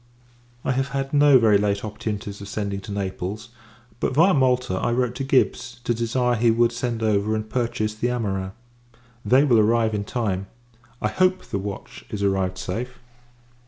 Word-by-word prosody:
I - - +1
have 135 +1 0
had 135 +1 -3
no 145 -2 +6
very 110 -4 +4
late 100 0 0
opportunities 105 -1 -5
of 100 - -8
sending 100 -1 -3
to 105 - -9
Naples: 100 +2 -4 0.5
but, - - -1
viâ 165 +7 +5
Malta, 125 -4 +2
I 120 - 0
wrote 125 -1 0
to 135 - -2
Gibbs, 125 -2 +1
to 120 - +1
desire 120 +2 0
he 115 +1 +3
would 115 +1 +3
send 120 -1 -3
over 110 0 +1
and 110 0 -3
purchase 115 -2 -1
the 110 +3 -2
amorins. 95 -6 -2 0.7
They 130 +2 +4
will 125 -6 +4
arrive 110 +1 +3
in 105 -1 -1
time. 100 -5 -2 0.6
I 105 - +2
hope, 185 - +1
the 100 - -3
watch 100 0 -7
is 100 -1 -4
arrived 95 -2 0
safe. 120 +8 -5
110 Hz, 175 wpm, -23 LUFS, 100-125 Hz, 0.7 s, no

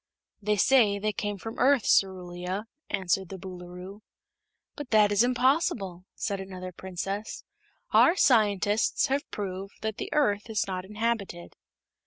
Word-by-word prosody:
"They 210 +1 +1
say 220 -3 +4
they 210 +1 -1
came 205 -1 -3
from 225 +3 -7
the - - -3
Earth, 265 -2 +4
Cerulia," 185 +1 0 0.2
answered 190 -1 0
the 195 - -7
Boolooroo. 180 +2 -9 0.7
"But 290 -4 -7
that 210 -3 +5
is 205 +1 +4
impossible," 245 - +1
said 200 -2 -2
another 185 -1 -7
Princess. 190 +4 -5 0.5
"Our 335 - +6
scientists 210 - +3
have 275 +2 -1
proved 195 -1 -5
that 220 -1 -2
the - - -5
Earth 210 -8 +1
is 215 -2 0
not 185 -1 -4
inhabited." 210 -4 -3
200 Hz, 140 wpm, -27 LUFS, 185-225 Hz, 0.7 s, Our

